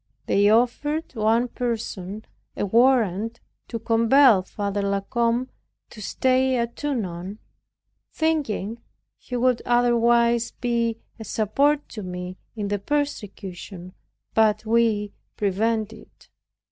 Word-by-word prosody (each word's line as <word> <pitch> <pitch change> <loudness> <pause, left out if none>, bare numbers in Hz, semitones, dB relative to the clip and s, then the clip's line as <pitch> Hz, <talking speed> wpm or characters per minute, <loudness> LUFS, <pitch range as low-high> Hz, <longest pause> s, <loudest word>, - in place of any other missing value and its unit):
They 205 +1 +3
offered 275 +8 +1
one 225 +1 +2
person 220 -4 -4 0.3
a - - 0
warrant 230 -1 +2 0.3
to 230 - -4
compel 230 0 +5
Father 200 +1 -3
La 200 0 0
Combe 235 +4 0 0.4
to 215 - -11
stay 260 +4 +1
at 235 0 -2
Tonon, 200 -9 -3 0.7
thinking 240 -9 -1 0.4
he 250 - -7
would 250 0 +2
otherwise 235 -1 +3
be 235 -2 -1 0.2
a - - -6
support 280 +8 +1
to 215 - -7
me 180 0 -6 0.2
in 205 -2 -3
the 205 0 -1
persecution, 195 -9 -4 0.4
but 215 0 +3
we 220 -2 +1 0.2
prevented 220 +2 0
it. - - -20
230 Hz, 110 wpm, -24 LUFS, 205-245 Hz, 0.7 s, compel